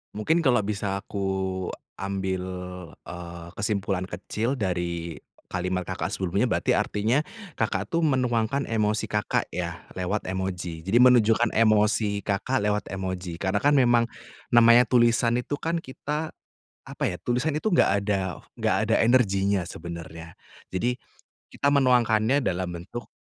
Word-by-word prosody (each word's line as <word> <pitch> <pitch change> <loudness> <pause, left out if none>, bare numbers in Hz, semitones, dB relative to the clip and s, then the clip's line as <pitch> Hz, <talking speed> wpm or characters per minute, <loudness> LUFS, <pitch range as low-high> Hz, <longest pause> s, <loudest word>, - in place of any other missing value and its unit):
Mungkin 160 +11 +1
kalau 125 -4 +4
bisa 100 -1 -2
aku 95 -2 -3 0.2
ambil, 95 -1 -2 0.6
eee, 85 -1 -8
kesimpulan 100 -2 -1
kecil 110 +8 -3
dari 85 -3 -2 0.4
kalimat 90 0 -1
Kakak, - - -3
sebelumnya, 95 +6 0
berarti - - +2
artinya 115 +8 +1 0.3
Kakak, - - -1
tuh 170 0 +1
menuangkan 130 -2 +1
emosi 110 -1 0
Kakak, 105 0 0
ya, 85 0 -5
lewat 95 +3 -2
emoji. 90 -3 -4
Jadi, 100 +7 +3
menunjukkan 120 -2 +5
emosi 105 -2 +3
Kakak 105 +6 0
lewat 105 0 0
emoji, 95 -2 -4
karena 95 +1 0
kan 145 - +5
memang 120 -3 +4 0.4
namanya 120 +1 +7
tulisan 120 -1 +3
itu 135 +4 -3
kan 165 +1 -1
kita, 150 +3 -4 0.6
apa - - -4
ya, 90 - -3
tulisan 125 +6 0
itu 220 - 0
enggak 170 - +4
ada 95 -3 -1 0.2
enggak - - +1
ada - - +3
energinya 100 -6 +3
sebenarnya. 85 -1 -8 0.4
Jadi, 120 +7 0 0.6
kita 140 - 0
menuangkannya 125 -1 +3
dalam 95 -2 -1
bentuk 120 +7 -8
105 Hz, 130 wpm, -26 LUFS, 95-120 Hz, 0.6 s, namanya